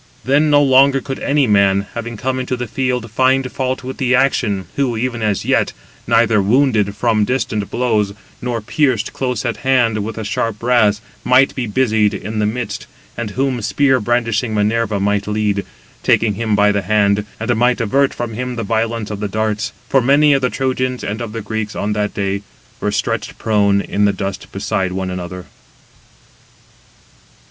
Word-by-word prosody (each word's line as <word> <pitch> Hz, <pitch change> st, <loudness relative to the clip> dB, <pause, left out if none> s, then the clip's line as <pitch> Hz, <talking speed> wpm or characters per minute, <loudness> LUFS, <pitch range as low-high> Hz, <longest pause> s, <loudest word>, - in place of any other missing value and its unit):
Then 145 Hz, +4 st, +3 dB
no 145 Hz, 0 st, +5 dB
longer 135 Hz, 0 st, +5 dB
could 135 Hz, 0 st, -6 dB
any 145 Hz, -1 st, +2 dB
man, 100 Hz, -2 st, +3 dB
having 115 Hz, -1 st, -5 dB
come 130 Hz, +2 st, -2 dB
into 130 Hz, 0 st, -2 dB
the 125 Hz, -, -3 dB
field, 125 Hz, -1 st, -2 dB
find 130 Hz, +2 st, +2 dB
fault 130 Hz, -1 st, -2 dB
with 130 Hz, +1 st, -6 dB
the 130 Hz, -1 st, +2 dB
action, 105 Hz, -8 st, +1 dB
who, 130 Hz, -5 st, 0 dB
even 120 Hz, 0 st, -2 dB
as 105 Hz, -2 st, 0 dB
yet -, -, +1 dB, 0.3 s
neither 115 Hz, -2 st, +3 dB
wounded 110 Hz, -2 st, +2 dB
from 110 Hz, 0 st, +1 dB
distant 110 Hz, -3 st, -1 dB
blows, 110 Hz, -4 st, +1 dB
193 100 Hz, +2 st, -18 dB
nor 120 Hz, -2 st, -2 dB
pierced 125 Hz, -1 st, 0 dB
close 125 Hz, -2 st, -2 dB
at 120 Hz, -, -1 dB
hand 120 Hz, -6 st, +2 dB
with 110 Hz, +1 st, -5 dB
the 110 Hz, -, -5 dB
sharp 105 Hz, +1 st, -2 dB
brass, 110 Hz, -3 st, +2 dB, 0.2 s
might 130 Hz, +2 st, +4 dB
be 125 Hz, -3 st, -3 dB
busied 110 Hz, -2 st, +2 dB
in 110 Hz, +2 st, -4 dB
the 105 Hz, -, +2 dB
midst, 110 Hz, -2 st, -4 dB, 0.3 s
and 120 Hz, -2 st, -4 dB
whom 130 Hz, +2 st, -1 dB
spear 130 Hz, +6 st, +2 dB
brandishing 115 Hz, 0 st, 0 dB
Minerva 105 Hz, 0 st, +1 dB
might 100 Hz, +1 st, 0 dB
lead, 105 Hz, -1 st, 0 dB, 0.4 s
taking 110 Hz, -2 st, +2 dB
him 110 Hz, 0 st, -1 dB
by 105 Hz, 0 st, +4 dB
the 100 Hz, 0 st, 0 dB
hand, 100 Hz, +1 st, +2 dB, 0.2 s
and 115 Hz, +2 st, 0 dB
might 125 Hz, +3 st, +2 dB
avert 135 Hz, +5 st, +2 dB
from 120 Hz, -2 st, -5 dB
him 125 Hz, +2 st, -4 dB
the 115 Hz, -, -3 dB
violence 115 Hz, 0 st, -1 dB
of 105 Hz, -, -5 dB
the 105 Hz, -, -2 dB
darts; 105 Hz, 0 st, -2 dB, 0.2 s
for 135 Hz, -, +3 dB
many 145 Hz, +4 st, +4 dB
of 135 Hz, -, +2 dB
the 125 Hz, -, +1 dB
Trojans 130 Hz, -1 st, -2 dB
and 105 Hz, +3 st, -4 dB
of 115 Hz, -2 st, -5 dB
the 115 Hz, +1 st, -5 dB
Greeks 110 Hz, 0 st, -4 dB
on 105 Hz, +1 st, -1 dB
that 105 Hz, 0 st, -2 dB
day 100 Hz, 0 st, -1 dB, 0.4 s
were -, -, -1 dB
stretched -, -, -2 dB
prone 100 Hz, -2 st, +2 dB
in 105 Hz, +1 st, 0 dB
the 100 Hz, -, +2 dB
dust 95 Hz, -1 st, -5 dB
beside 95 Hz, -2 st, -2 dB
one 95 Hz, 0 st, -3 dB
another. 90 Hz, 0 st, -6 dB
115 Hz, 185 wpm, -18 LUFS, 105-125 Hz, 0.4 s, no